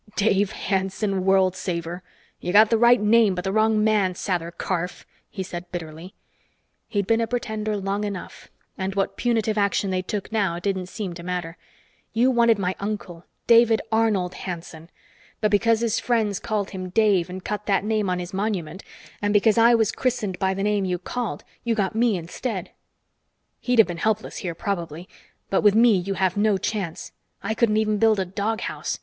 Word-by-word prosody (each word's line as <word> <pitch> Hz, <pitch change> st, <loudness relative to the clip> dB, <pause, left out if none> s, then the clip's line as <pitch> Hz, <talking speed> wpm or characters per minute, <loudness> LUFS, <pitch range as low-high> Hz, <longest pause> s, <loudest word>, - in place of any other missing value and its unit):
"Dave 200 Hz, -1 st, +2 dB
Hanson, 190 Hz, 0 st, -1 dB
world 190 Hz, -1 st, +3 dB
saver! 175 Hz, -1 st, -4 dB, 0.4 s
You 175 Hz, -, -3 dB
got 215 Hz, +3 st, +6 dB
the 225 Hz, -, +4 dB
right 240 Hz, +1 st, +6 dB
name 210 Hz, -1 st, +4 dB
but 180 Hz, -, -4 dB
the 190 Hz, -, -1 dB
wrong 215 Hz, 0 st, +2 dB
man, 205 Hz, -4 st, +2 dB
Sather 175 Hz, -3 st, -2 dB
Karf," 180 Hz, +1 st, -4 dB, 0.2 s
he 190 Hz, -, -5 dB
said 180 Hz, -1 st, -8 dB
bitterly. 165 Hz, +1 st, -7 dB, 0.7 s
He'd 200 Hz, -3 st, -1 dB
been 225 Hz, +2 st, +2 dB
a 230 Hz, -, 0 dB
pretender 215 Hz, -3 st, -2 dB
long 200 Hz, +1 st, -2 dB
enough, 200 Hz, -4 st, -6 dB, 0.3 s
and 190 Hz, +1 st, -3 dB
what 195 Hz, -1 st, -1 dB
punitive 225 Hz, -3 st, 0 dB
action 200 Hz, -1 st, +1 dB
they 185 Hz, 0 st, 0 dB
took 200 Hz, +3 st, -5 dB
now 200 Hz, -6 st, 0 dB
didn't 185 Hz, 0 st, -2 dB
seem 195 Hz, -2 st, -5 dB
to 170 Hz, -, -9 dB
matter. 175 Hz, -1 st, -4 dB, 0.6 s
"You 245 Hz, +4 st, +3 dB
wanted 235 Hz, -2 st, +4 dB
my 185 Hz, -2 st, -1 dB
uncle, 200 Hz, -4 st, -5 dB, 0.2 s
David 230 Hz, -1 st, +5 dB
Arnold 215 Hz, -5 st, +1 dB
Hanson. 170 Hz, -2 st, -7 dB, 0.5 s
But 215 Hz, -1 st, +1 dB
because 225 Hz, +2 st, +3 dB
his 230 Hz, -1 st, +1 dB
friends 220 Hz, -5 st, 0 dB
called 210 Hz, -3 st, -2 dB
him 185 Hz, -1 st, -6 dB
Dave 195 Hz, -3 st, +2 dB
and 185 Hz, +1 st, -8 dB
cut 210 Hz, 0 st, -4 dB
that 195 Hz, -2 st, +2 dB
name 215 Hz, -2 st, 0 dB
on 180 Hz, -, 0 dB
his 180 Hz, 0 st, -6 dB
monument, 190 Hz, -4 st, -3 dB, 0.4 s
and 205 Hz, 0 st, +1 dB
because 215 Hz, +2 st, +4 dB
I 235 Hz, +1 st, +6 dB
was 220 Hz, -2 st, +2 dB
christened 220 Hz, -8 st, -2 dB
by 190 Hz, 0 st, +1 dB
the 195 Hz, -, -2 dB
name 205 Hz, -1 st, +1 dB
you 180 Hz, -1 st, -1 dB
called, 200 Hz, -2 st, -4 dB, 0.2 s
you 235 Hz, -1 st, 0 dB
got 195 Hz, -4 st, 0 dB
me 225 Hz, -2 st, +2 dB
instead. 185 Hz, +3 st, -5 dB, 0.9 s
He'd 250 Hz, -1 st, 0 dB
have 225 Hz, -, +7 dB
been 175 Hz, -1 st, -5 dB
helpless 215 Hz, +4 st, -1 dB
here, 175 Hz, -4 st, -4 dB
probably, 170 Hz, -3 st, -4 dB, 0.4 s
but 195 Hz, -, +3 dB
with 205 Hz, -1 st, +5 dB
me 230 Hz, -1 st, +6 dB
you 195 Hz, +2 st, -2 dB
have 185 Hz, 0 st, 0 dB
no 205 Hz, -1 st, +3 dB
chance. 190 Hz, -5 st, -4 dB, 0.3 s
I 210 Hz, +3 st, -1 dB
couldn't 220 Hz, -1 st, +2 dB
even 215 Hz, -1 st, +1 dB
build 220 Hz, -2 st, +4 dB
a 190 Hz, -, 0 dB
doghouse. 205 Hz, +5 st, -3 dB
200 Hz, 185 wpm, -24 LUFS, 185-220 Hz, 0.9 s, have